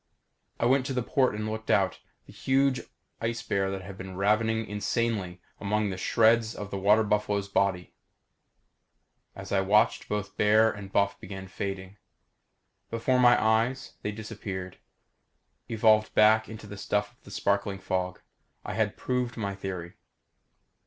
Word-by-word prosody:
I - - +1
went 130 +2 +3
to 135 - -2
the 125 - 0
port 130 -2 +1
and 105 +1 -3
looked 110 +1 -5
out. 95 -2 +2 0.3
The - - -15
huge 135 -1 +1 0.4
ice 115 +1 -2
bear 95 0 -1
had 95 0 -10
been 95 0 -7
ravening 110 +3 +2
insanely 105 -3 -2 0.2
among 105 0 0
the - - -3
shreds 115 +2 +3
of 105 -1 -7
the 100 - -3
water 105 +3 +4
buffalo's 105 -1 0
body. 95 -2 0 1.4
As - - -9
I 95 - +3
watched 105 +3 +2
both 105 -1 -3
bear 110 +2 +5
and 100 -2 -9
buff 100 0 +1
began 95 0 -8
fading. 95 0 -5 0.9
Before 120 +3 +1
my 120 -1 +6
eyes, 115 +4 +1
they 105 - -2
disappeared, 100 -4 -7 0.9
evolved 110 -1 +3
back 110 +1 +5
into 110 -1 -9
the 100 0 -9
stuff 105 +1 -1
of - - -33
the - - -13
sparkling 100 0 0
fog. 90 -1 -3 0.4
I - - -4
had - - 0
proved 125 -1 -2
my 100 -3 -2
theory. 95 -3 -6
105 Hz, 150 wpm, -28 LUFS, 95-110 Hz, 1.4 s, my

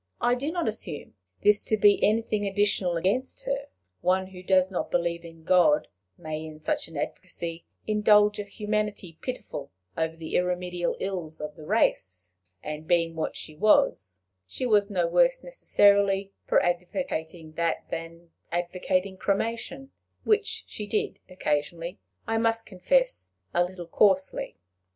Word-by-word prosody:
I 240 0 +3
do 275 +5 -1
not 345 -1 -1
assume 215 -8 -5 0.3
this 210 0 +6
to 220 - +2
be 205 0 +5
anything 215 -1 +2
additional 195 -3 +1
against 250 - 0
her; - - -2 0.3
one 185 +1 +2
who 185 -1 -11
does 185 0 +3
not 180 - -2
believe 170 -1 0
in 165 -1 -12
God, 165 -4 +4 0.3
may 155 -2 -5
in 155 -1 -8
such 155 - -1
an 165 -2 -9
advocacy 165 +3 -5 0.2
indulge 210 -1 +4
a - - -1
humanity 210 -4 -3
pitiful 250 - -5 0.3
over 160 0 -1
the 165 -1 -6
irremediable 180 -1 -1
ills 175 -5 -3
of 150 0 -6
the 155 - -11
race; 90 - 0 0.3
and, 150 +1 -6
being 165 -2 +2
what 160 - -2
she 155 - -7
was, 95 - +3 0.3
she 255 - -4
was 210 -3 +3
no 180 -4 +1
worse - - +3
necessarily 200 - +3 0.2
for - - +4
advocating 175 - -3
that 165 +1 -1
than 165 +1 -6 0.2
for - - -3
advocating 185 +2 -1
cremation, 230 +8 -2 0.3
which 440 +1 +1
she 210 - -7
did 210 - -1
occasionally, 170 +1 -2 0.3
I 225 0 0
must 225 0 +1
confess, - - 0 0.2
a 175 - +4
little 180 0 -6
coarsely. 190 +2 +2
185 Hz, 145 wpm, -27 LUFS, 165-215 Hz, 0.3 s, this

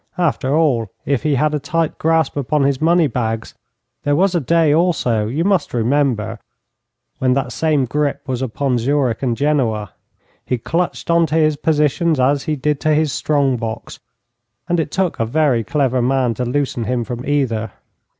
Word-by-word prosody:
After 150 -5 0
all, 135 -9 +2 0.2
if 140 -3 0
he 150 -2 +1
had 150 +3 +1
a 150 - 0
tight 160 +3 -2
grasp 160 -2 +1
upon 145 +1 0
his 140 0 0
money 170 +1 +4
bags, 115 -4 -3 0.5
there 145 0 +1
was 190 +4 +2
a 175 - +2
day 160 +1 +2
also, 140 -10 +1
you 145 +9 -1
must 195 -8 0
remember, 115 -3 0 0.8
when 130 -1 +2
that 135 -2 -1
same 150 0 +1
grip 145 +2 -1
was 130 -2 -3
upon 130 0 -1
Zurich 130 -2 0
and 120 -4 -1
Genoa. 115 -9 0 0.5
He 125 - -1
clutched 170 +7 -2
on 170 -1 +3
to 155 - -2
his 155 -2 +3
positions 150 +1 +1
as 135 +2 +2
he 155 - -1
did 145 +1 -1
to 155 -1 +2
his 155 -2 +1
strong 140 -4 +1
box, 115 -1 -6 0.7
and 175 -2 +1
it 155 - -1
took 185 +1 -1
a - - +2
very 135 -3 +1
clever 135 -2 0
man 125 -1 +1
to 125 - -3
loosen 125 -2 -1
him 125 0 -1
from 120 +1 -6
either. 120 -7 -1
140 Hz, 180 wpm, -18 LUFS, 125-155 Hz, 0.8 s, money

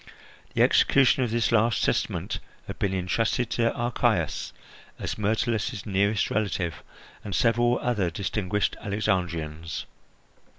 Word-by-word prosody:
The - - +5
execution 135 0 +4
of 120 - -1
this 115 0 +1
last 115 -3 +3
testament - - -1 0.3
had - - -8
been 100 - +1
intrusted 100 +6 0
to 115 -1 +2
Archias, 120 0 0 0.5
as - - -3
Myrtilus's 110 +1 -1
nearest 100 +1 +1
relative, 95 -5 -1 0.4
and 100 - -4
several 120 +1 +3
other 105 -8 +1
distinguished 100 +3 -1
Alexandrians. 85 -7 -2
105 Hz, 115 wpm, -26 LUFS, 95-115 Hz, 0.5 s, The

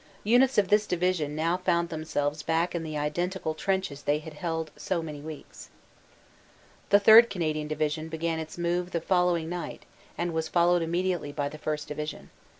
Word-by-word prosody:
Units 245 +5 +4
of 200 -3 +3
this 210 0 +3
division 175 -4 0
now 165 +3 +1
found 170 -2 0
themselves 155 -2 -2
back 165 +2 0
in 170 - -2
the 155 -2 -4
identical 160 +3 -2
trenches 190 -4 -2
they 145 +1 +1
had 155 0 -9
held 160 -1 -3
so 170 -3 -2
many 150 -2 -7
weeks. 155 0 -10 1.2
The 205 - +6
3rd. 220 +3 +8
Canadian 155 -4 -2
Division 155 +1 -2
began 165 0 -2
its 160 +1 -7
move 175 +1 -1
the 170 - +1
following 180 -2 +1
night 175 +1 -6 0.3
and 175 -1 -2
was 160 0 -1
followed 175 +1 +3
immediately 170 -2 -1
by 145 -1 -2
the 155 - -10
1st. 150 0 -3
Division. 150 +1 -6
165 Hz, 170 wpm, -28 LUFS, 155-180 Hz, 1.2 s, 3rd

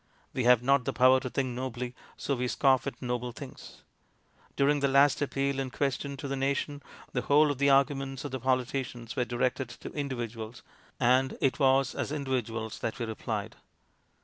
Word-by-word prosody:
We 125 - -1
have 125 -1 +6
not 135 0 +3
the - - -1
power 130 +1 +6
to 130 - -5
think 130 +1 -1
nobly, 125 0 -4 0.2
so 140 - -1
we 125 0 -1
scoff 135 +1 +3
at 140 - -5
noble 125 0 -2
things. - - -11 0.7
During 145 +1 +3
the 140 - +2
last 140 +1 +4
appeal 140 -1 0
in 135 -1 -2
question 140 +1 -2
to 140 - -5
the 135 - -2
nation, 140 +2 -1 0.3
the 125 - 0
whole 145 +3 +4
of 140 - -5
the 140 0 +4
arguments 135 0 +2
of 145 - -4
the 130 - -3
politicians 125 -2 -2
were 125 -3 +1
directed 125 +1 -1
to 120 - -9
individuals, 120 -5 -5 0.4
and 130 +2 +3
it 135 -1 +1
was 135 -1 +3
as - - -3
individuals 120 -6 -3
that 110 - -3
we 120 - -2
replied. 110 -1 -4
130 Hz, 180 wpm, -29 LUFS, 125-140 Hz, 0.7 s, have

